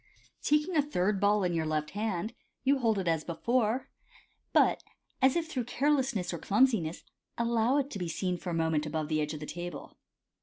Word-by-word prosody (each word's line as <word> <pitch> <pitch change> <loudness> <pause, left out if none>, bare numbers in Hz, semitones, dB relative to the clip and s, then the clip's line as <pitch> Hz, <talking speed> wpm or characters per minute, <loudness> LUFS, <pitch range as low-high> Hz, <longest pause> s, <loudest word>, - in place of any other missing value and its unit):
Taking 300 +4 +2
a 300 - +5
third 210 -8 0
ball 205 0 +3
in 180 -1 +1
your 160 -1 0
left 155 -1 -1
hand, 210 0 -2 0.3
you 275 +1 +3
hold 225 -4 +2
it 190 -2 -2
as 165 -2 +1
before, 235 +8 0 0.6
but, - - +4 0.4
as 265 0 +5
if 335 -1 0
through 260 -7 -3
carelessness 260 -9 +1
or 170 - -4
clumsiness, 205 -7 +2 0.3
allow 235 +2 +2
it 280 0 -1
to 200 - -5
be 175 -2 -3
seen 180 +2 -1
for 180 - -5
a - - -2
moment 160 -2 +1
above 155 0 -2
the 155 -1 +1
edge 150 +1 -2
of - - -7
the 150 - -6
table. 175 -2 -7
205 Hz, 195 wpm, -30 LUFS, 165-255 Hz, 0.6 s, a